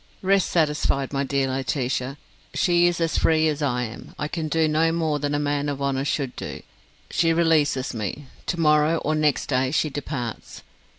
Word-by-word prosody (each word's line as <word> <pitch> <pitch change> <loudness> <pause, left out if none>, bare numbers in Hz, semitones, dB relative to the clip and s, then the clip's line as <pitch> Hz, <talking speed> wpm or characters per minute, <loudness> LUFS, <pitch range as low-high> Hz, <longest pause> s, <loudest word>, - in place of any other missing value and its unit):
"Rest 195 0 +3
satisfied, 150 -4 +1
my 140 0 0
dear 135 0 0
Laetitia. 130 0 -2 0.4
She 175 -1 +4
is 175 0 0
as 165 -1 +1
free 160 0 +3
as 155 -1 -1
I 125 -4 0
am. 115 -1 -8
I 150 - -2
can 160 0 -3
do 160 +1 +2
no 160 +2 +2
more 160 -3 0
than 145 0 -1
a - - 0
man 145 0 0
of 140 -1 -3
honour 140 -1 -1
should 140 -3 -1
do. - - -7 0.5
She 165 -1 +2
releases 155 -6 +2
me. 115 +6 -4 0.2
To 175 - -1
morrow 150 +1 +4
or 155 - -1
next 150 -2 +1
day 130 -1 +1
she 150 +1 0
departs. 130 - -5
145 Hz, 185 wpm, -24 LUFS, 135-160 Hz, 0.5 s, She